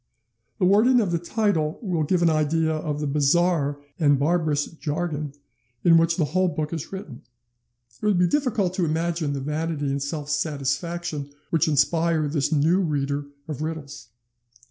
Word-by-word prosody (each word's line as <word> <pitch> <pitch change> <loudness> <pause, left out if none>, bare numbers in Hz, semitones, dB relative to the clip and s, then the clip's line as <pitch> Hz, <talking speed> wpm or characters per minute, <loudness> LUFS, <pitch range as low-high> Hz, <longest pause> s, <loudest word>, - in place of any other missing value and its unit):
The 185 - +2
wording 220 +7 +5
of 200 -6 0
the 170 - +1
title 170 -4 0
will 180 -7 -1
give 170 +3 +1
an 170 - +5
idea 160 +1 +1
of 155 -1 -2
the - - -1
bizarre 145 +1 +2 0.2
and 145 -3 +4
barbarous 155 0 +1
jargon 155 -2 -4 0.5
in 170 -1 +6
which 165 0 +2
the 160 - +2
whole 185 +4 +1
book 155 -1 -3
is 160 -3 -5
written. 175 -10 -8 0.7
It - - -22
would 205 -3 +3
be 180 - +4
difficult 220 -6 0
to 185 -2 0
imagine 160 -1 -1
the 140 - -3
vanity 150 0 -2
and 140 0 -2
self 145 +1 -4
satisfaction 150 +1 -2 0.2
which 165 -2 +2
inspire 155 +2 +2
this 145 0 -1
new 160 +4 +3
reader 145 -4 -1 0.2
of 150 -3 -5
riddles. 155 -4 -6
160 Hz, 165 wpm, -24 LUFS, 145-175 Hz, 0.7 s, in